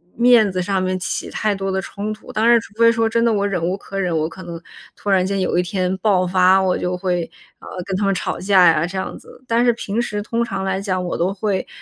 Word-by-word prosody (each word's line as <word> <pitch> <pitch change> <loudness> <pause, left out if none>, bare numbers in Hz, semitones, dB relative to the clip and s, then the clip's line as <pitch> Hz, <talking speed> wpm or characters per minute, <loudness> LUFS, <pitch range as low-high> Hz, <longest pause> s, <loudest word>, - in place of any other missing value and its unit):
面 235 -4 +5
子 185 0 -2
上 190 +1 -1
面 185 0 -1
起 185 - -4
太 210 -2 -1
多 195 0 -3
的 190 0 -1
冲 205 +3 -5
突， 215 - -12
当 220 +2 +1
然 235 0 +6
除 215 - -14
非 230 0 +6
说 225 -1 +1
真 230 +1 +1
的， 230 - +3
我 200 -1 +1
忍 180 -4 -2
无 180 +2 0
可 195 0 -7
忍， 180 -3 0
我 155 0 0
可 185 +2 -11
能 170 -1 -8 0.3
突 205 - -6
然 190 -2 +3
间 195 +1 -1
有 185 - 0
一 180 - +3
天 185 +1 -1
爆 190 -2 +2
发， 185 +1 +4
我 185 -1 +1
就 180 0 -2
会， 180 -1 -1 0.3
呃， - - -14 0.2
跟 190 -2 -2
他 205 - 0
们 195 - +2
吵 185 - -3
架 185 -1 +5
呀， 160 -1 +3
这 180 +3 -7
样 190 - -4
子。 - - -16
但 235 +1 +2
是 240 - +4
平 225 -1 -3
时 210 -3 -2
通 230 +2 -1
常 195 -4 -4
来 190 0 -1
讲， 185 -2 -2
我 175 - -3
都 180 +3 0
会， 195 -1 -2
195 Hz, 290 characters per minute, -20 LUFS, 185-215 Hz, 0.3 s, 然